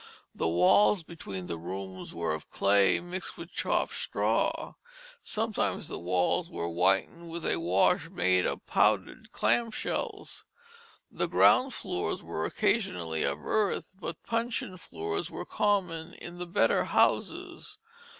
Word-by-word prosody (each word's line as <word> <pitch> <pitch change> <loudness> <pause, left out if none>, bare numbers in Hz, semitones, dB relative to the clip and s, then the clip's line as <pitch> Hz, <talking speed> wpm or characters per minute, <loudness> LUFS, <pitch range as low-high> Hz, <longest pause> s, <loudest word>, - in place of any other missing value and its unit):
The - - -1
walls 90 - +4
between 100 - -7
the 85 -2 -4
rooms 95 +2 -6
were 85 -2 -1
of 80 - -6
clay 100 0 +3
mixed 180 +2 -6
with - - -9
chopped - - 0
straw. - - 0 0.5
Sometimes 220 0 -1
the - - -4
walls 90 - +1
were 85 - -3
whitened 95 - +1
with 170 0 -5
a - - +2
wash 90 +3 +2
made 90 +1 +2
of - - -4
powdered - - +1
clam 235 -1 +2
shells. 215 - -4 0.7
The - - -1
ground 260 -1 +4
floors 90 - -2
were 80 - -3
occasionally 80 -3 0
of 70 +1 -1
earth, 210 -3 0
but 175 -3 -7
puncheon 230 -4 -2
floors 80 - -4
were - - -6
common 180 -6 0
in 175 0 -10
the 180 - -4
better 170 - +2
houses. 425 -1 0
100 Hz, 135 wpm, -29 LUFS, -, 0.7 s, walls